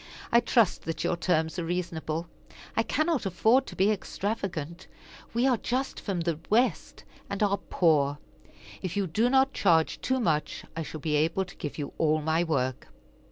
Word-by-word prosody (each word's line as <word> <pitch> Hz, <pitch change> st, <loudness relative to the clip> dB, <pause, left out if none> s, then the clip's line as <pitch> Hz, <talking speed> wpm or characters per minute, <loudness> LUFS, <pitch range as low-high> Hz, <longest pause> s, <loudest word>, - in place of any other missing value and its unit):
I 235 Hz, -, +7 dB
trust 230 Hz, -4 st, +2 dB
that 165 Hz, -, -3 dB
your -, -, +1 dB
terms 160 Hz, 0 st, 0 dB
are -, -, -2 dB
reasonable. 165 Hz, -1 st, -3 dB, 0.5 s
I -, -, +3 dB
cannot 310 Hz, -1 st, 0 dB
afford 225 Hz, +8 st, +3 dB
to -, -, -8 dB
be 195 Hz, +3 st, +3 dB
extravagant. 190 Hz, -5 st, -4 dB, 0.4 s
We 235 Hz, +3 st, +1 dB
are 255 Hz, -3 st, +3 dB
just 255 Hz, +4 st, -2 dB
from 190 Hz, -4 st, -2 dB
the 165 Hz, -2 st, -1 dB
West, 240 Hz, +4 st, +1 dB, 0.3 s
and 200 Hz, +1 st, -1 dB
are 200 Hz, -1 st, +2 dB
poor. 150 Hz, -7 st, +2 dB, 0.6 s
If 185 Hz, +1 st, -4 dB
you 200 Hz, -, +1 dB
do 220 Hz, +8 st, +1 dB
not 270 Hz, +1 st, +3 dB
charge 165 Hz, -4 st, +2 dB
too 260 Hz, 0 st, 0 dB
much, 155 Hz, -10 st, -1 dB
I 165 Hz, -, -2 dB
shall 155 Hz, -1 st, -6 dB
be 150 Hz, -1 st, 0 dB
able 165 Hz, +5 st, +1 dB
to 180 Hz, -, -13 dB
give 150 Hz, -5 st, -6 dB
you 145 Hz, -2 st, -5 dB
all 155 Hz, -1 st, +3 dB
my 160 Hz, +2 st, +1 dB
work." 130 Hz, -6 st, -1 dB
175 Hz, 175 wpm, -28 LUFS, 160-220 Hz, 0.6 s, I